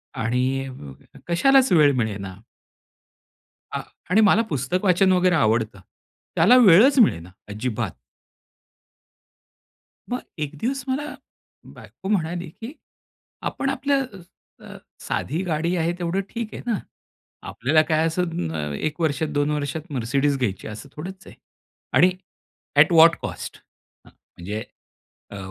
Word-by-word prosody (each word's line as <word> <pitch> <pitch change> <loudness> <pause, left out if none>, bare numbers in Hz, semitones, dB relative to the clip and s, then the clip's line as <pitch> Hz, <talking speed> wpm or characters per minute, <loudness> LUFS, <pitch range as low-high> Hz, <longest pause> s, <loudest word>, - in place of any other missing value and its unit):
आणि 125 +3 0 0.8
कशालाच 265 +9 +4
वेळ 150 -4 +5
मिळेना. 100 -5 -3 1.4
आ, - - -3 0.3
आणि 210 +4 +4
मला 210 +1 +5
पुस्तक 145 - -1
वाचन 190 +1 +4
वगैरे 180 0 +3
आवडतं. 110 - +1 0.6
त्याला 215 +10 +6
वेळच 245 +5 +7
मिळेना 90 - +3 0.2
अजिबात. 110 +2 -3 2.2
मग 250 - -2 0.2
एक 150 0 -4
दिवस 270 +2 -2
मला 275 +3 -1 0.7
बायको 190 - -11
म्हणाली 175 -3 -1
की 245 +7 -7 0.8
"आपण 275 - -2
आपलं 275 -1 0 0.6
अ, - - -11 0.2
साधी 160 +6 -3
गाडी 170 +1 -1
आहे 170 +1 0
तेवढं 175 +2 -1
ठीक 230 -2 -5
आहे - - -7
ना? 225 -4 +1 0.7
आपल्याला 155 +6 +2
काय 160 +1 +2
असं 170 +2 -1 0.3
अ, 75 -1 -3
1 155 - -3
वर्षात, 155 -1 0
2 145 0 0
वर्षात 150 +3 -4
Mercedes 135 +3 0
घ्यायची 100 -6 -2
आहे 110 - -6
असं 135 +6 -10
थोडंच 185 +5 -8
आहे. - - -13 0.6
आणि 180 +1 +5 0.7
एट - - +6
वॉट 165 +1 +7
कॉस्ट? - - -6 0.5
म्हणजे 105 +5 -8 0.7
अ, 100 - -8
160 Hz, 120 wpm, -23 LUFS, 130-190 Hz, 2.2 s, वेळच